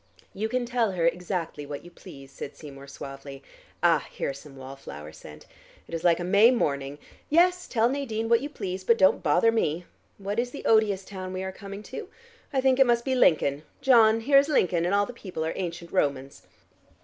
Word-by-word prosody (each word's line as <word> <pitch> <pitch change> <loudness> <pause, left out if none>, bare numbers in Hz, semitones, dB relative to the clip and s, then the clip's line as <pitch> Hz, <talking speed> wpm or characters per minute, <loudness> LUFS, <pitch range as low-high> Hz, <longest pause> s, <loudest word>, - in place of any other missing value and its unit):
"You 215 +3 -3
can 250 +1 -1
tell 235 -4 0
her 170 -2 0
exactly 175 -3 -3
what 145 +2 -7
you 175 - -12
please," 140 -6 -13
said 140 - -8
Seymour 140 -2 -11
suavely. 135 0 -9 0.4
"Ah, 165 -4 +3
here - - -3
is 135 - -10
some 140 -1 -14
wall 135 0 -9
flower 75 - -10
scent. 75 -1 -13 0.4
It - - -13
is 165 - -3
like 170 -1 +4
a - - -3
May 200 +6 +5
morning. 140 - -1 0.3
Yes, 360 +3 +3
tell 230 -1 +2
Nadine 240 -4 -2
what 235 0 +4
you 285 - -4
please, 190 -8 -5
but 230 +4 +3
don't 190 -3 +4
bother 175 +8 +3
me. 175 -6 -1 0.3
What 200 +2 -3
is 245 +1 -1
the 280 - -9
odious 210 -4 +3
town 185 -2 -7
we 185 0 -4
are 190 - -4
coming 200 +2 -9
to? 370 - -8 0.4
I 270 -2 +1
think 260 0 +3
it 270 - +6
must 235 0 +2
be 265 - 0
Lincoln. 150 - +3 0.2
John, 230 -5 +5
here 275 +4 +5
is 280 +2 0
Lincoln, 175 - +2
and 185 +3 +1
all 205 0 +3
the 245 - -9
people 185 -8 -5
are 160 - -2
ancient 170 -2 -5
Romans." 140 -6 -1
190 Hz, 210 wpm, -26 LUFS, 150-235 Hz, 0.4 s, it